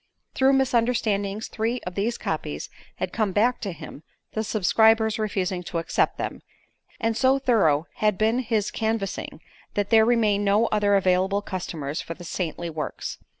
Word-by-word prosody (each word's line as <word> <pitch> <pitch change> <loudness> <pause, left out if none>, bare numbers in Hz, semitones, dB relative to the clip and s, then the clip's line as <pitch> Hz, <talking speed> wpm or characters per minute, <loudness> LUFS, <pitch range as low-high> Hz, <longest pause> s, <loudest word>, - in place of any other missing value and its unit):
Through 265 +1 +4
misunderstandings 225 -5 +1
three 230 +3 -2
of 180 - -4
these 215 +5 -1
copies - - -4 0.2
had - - -4
come 210 -4 0
back 235 +5 +2
to 200 - -3
him, 150 -3 -10 0.3
the 220 - -2
subscribers 220 +1 +3
refusing 195 -4 -1
to 170 - -4
accept 165 - 0
them; - - -4 0.6
and 225 -1 0
so 260 +3 +3
thorough 195 - +2
had 210 -3 +2
been 220 +3 +2
his 220 -4 0
canvassing 220 -3 -3 0.3
that 205 +1 -1
there 220 -1 +7
remained 220 -3 +2
no 205 +3 +3
other 205 -1 +3
available 190 +1 +2
customers 160 -6 -4
for 165 - -7
the 175 - -11
saintly 170 -1 -3
works. 155 -2 -5
210 Hz, 155 wpm, -25 LUFS, 185-225 Hz, 0.6 s, there